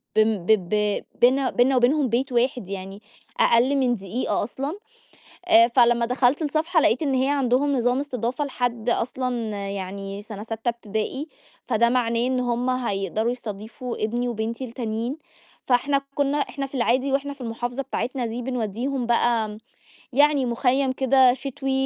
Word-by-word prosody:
بم 215 -4 +2
ب - - +3 0.2
ب 210 0 0 0.2
بيننا 255 +2 +4
بيننا 260 +2 +3
وبينهم 260 +2 +3
بيت 255 +4 0
واحد 245 -4 0
يعني، 195 +1 -7 0.4
أقل 245 +4 +4
من 255 -3 +2
دقيقة 200 +4 -2
أصلًا، 280 - -5 0.7
آآ 230 -8 +7
فلمّا 235 -1 +4
دخلت 250 +4 +2
الصفحة 315 +3 +1
لقيت 245 - +2
إن 280 -3 0
هي 260 +1 +2
عندهم 280 0 +2
نظام 245 +1 +1
استضافة 260 0 -2
لحد 245 -4 -2
أصلًا 250 +2 -1 0.4
يعني 195 +1 -5
سَنة 210 -1 -8
سَتّة 225 +1 -3
ابتدائي، 235 +5 -3 0.4
فده 235 +2 +2
معناه 235 -1 +1
إن 255 0 0
هُم 245 0 0
هيقدروا 220 -2 -1
يستضيفوا 230 +1 -6
ابني 240 +3 -1
وبنتي 230 +2 -3
التانيين، 235 +2 -4 0.5
فإحنا 275 +3 +2
كنّا 285 0 +1
إحنا 275 -1 -2
في 275 - -10
العادي 255 +3 +1
وإحنا 280 +1 -1
في 275 - -15
المحافظة 245 +3 -3
بتاعتنا 250 -1 -3
دي 230 +2 -4
بنودّيهم 245 +1 -2
بقى، 230 -3 +1 0.6
يعني 285 0 +4
مُخيّم 260 +2 +1
كده 260 -1 +4
شتوي 270 +1 -5
245 Hz, 150 wpm, -24 LUFS, 230-270 Hz, 0.7 s, آآ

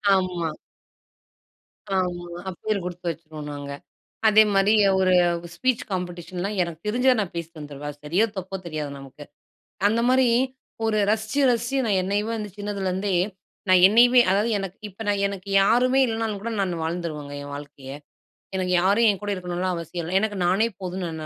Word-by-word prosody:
ஆமா. 180 -3 -1 1.5
ஆமா. 180 -2 -1 0.2
அ - - 0
பேரு 215 -2 0
குடுத்து 180 0 -4
வச்சுருவோம் 155 -2 -7
நாங்க. 145 -1 -6 0.6
அதேமாரி 210 -1 +5 0.3
ஒரு 185 -1 +3 0.4
ஸ்பீச் 255 +8 0
காம்படேஷன்லாம் 180 +2 -4
எனக்கு 170 -2 -5
தெரிஞ்சத 250 +4 +3
நான் 195 -4 -3
பேசிட்டு 170 -1 -6
வந்துருவேன். 145 0 -7
அது 145 - -13
சரியோ! 175 +9 +2
தப்போ! 190 +1 -4
தெரியாது 155 -3 -4
நமக்கு. 135 +2 -11 0.6
அந்தமாரி 245 +4 +3 0.6
ஒரு 220 -1 +1
ரசிச்சு 220 +5 0
ரசிச்சு 240 +3 0
நான் 200 -3 +2
என்னையவ 205 +3 -1
வந்து 210 -2 -5
சின்னதுல 205 -2 -3
இருந்தே 190 +1 -1 0.5
நான் 185 -1 +6
என்னையவே 245 +5 +6
அதாவது, 205 +4 +2
எனக்கு 195 -1 -6
இப்ப 200 +2 -19
நான், 205 -1 +1
எனக்கு 200 -1 -6
யாருமே 250 +5 +3
இல்லனாலும் 225 -2 -2
கூட, 230 +3 -4
நானு 180 -4 -1
வாழ்ந்துருவேங்க. 160 -3 -4
என் 145 0 -8
வாழ்க்கைய. 140 -2 -9 0.7
எனக்கு 185 -1 -1
யாரும் 205 +5 +4
என் 200 -2 0
கூட 205 - -4
இருக்கணுன்லாம் 180 0 -2
அவசியம் 170 +1 -5
இல்ல. 180 +3 +1
எனக்கு 210 -1 -2
நானே 195 +6 +3
போதும்ன்னு 185 -1 -4
நா 155 - -6
190 Hz, 155 wpm, -24 LUFS, 170-210 Hz, 1.5 s, நான்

